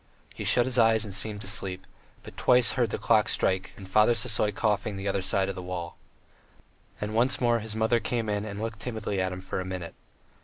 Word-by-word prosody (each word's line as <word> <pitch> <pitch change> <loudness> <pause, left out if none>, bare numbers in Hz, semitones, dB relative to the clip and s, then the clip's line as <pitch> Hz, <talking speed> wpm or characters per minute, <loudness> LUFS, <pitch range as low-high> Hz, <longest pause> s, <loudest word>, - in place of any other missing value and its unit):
He - - -6
shut 120 - +3
his 130 -1 +1
eyes 115 -1 +4
and 100 - -5
seemed 105 +1 -1
to - - -7
sleep, 95 -1 -3 0.4
but - - -12
twice 125 -1 +4
heard 120 -3 0
the - - -3
clock 110 0 +3
strike 95 0 0
and 95 - -10
Father 105 +4 +4
Sisoy 105 -2 +3
coughing 105 -1 -1
the 95 +1 -4
other 100 0 0
side 95 +1 +1
of 100 - -2
the 95 - -7
wall. 90 -1 -5 1.0
And 105 +1 -4
once 120 +4 +2
more 120 -2 +2
his 110 0 -5
mother 110 +2 +2
came 115 +1 -2
in 105 -1 -1
and 100 -1 -6
looked 110 -1 -4
timidly 110 -5 -3
at 95 0 -1
him 90 0 -6
for 95 - -4
a - - -2
minute. 90 -2 -6
105 Hz, 225 wpm, -27 LUFS, 95-115 Hz, 1.0 s, eyes